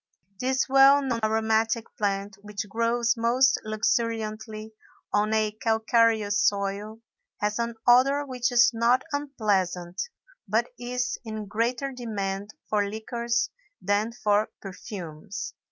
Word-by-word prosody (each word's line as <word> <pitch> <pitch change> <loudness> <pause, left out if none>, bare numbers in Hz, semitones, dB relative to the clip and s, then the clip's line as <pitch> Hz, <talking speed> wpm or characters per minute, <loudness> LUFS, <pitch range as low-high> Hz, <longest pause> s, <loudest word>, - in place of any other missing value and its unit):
This 260 +1 +1
well 275 +1 +6
known 245 -4 -1
aromatic 220 +1 +1
plant, 200 -1 -2
which 205 0 -5
grows 230 +2 +1
most 250 +3 +3
luxuriantly 215 0 -2 0.4
on 210 +1 +2
a 215 -1 +2
calcareous 220 -1 +2
soil, 200 +2 -1 0.4
has 210 +2 -1
an 235 0 -2
odor 270 +4 +5
which 250 -2 -1
is 240 -1 +6
not 235 +3 +3
unpleasant 195 -11 -1 0.5
but 225 +4 +1
is 250 +1 -2
in 215 -2 -5
greater 240 +6 -1
demand 205 -5 -4 0.2
for 205 -1 +1
liqueurs 235 +2 -2 0.3
than 205 +3 0
for 210 -2 +1
perfumes. 195 -2 -7
220 Hz, 115 wpm, -26 LUFS, 205-240 Hz, 0.5 s, well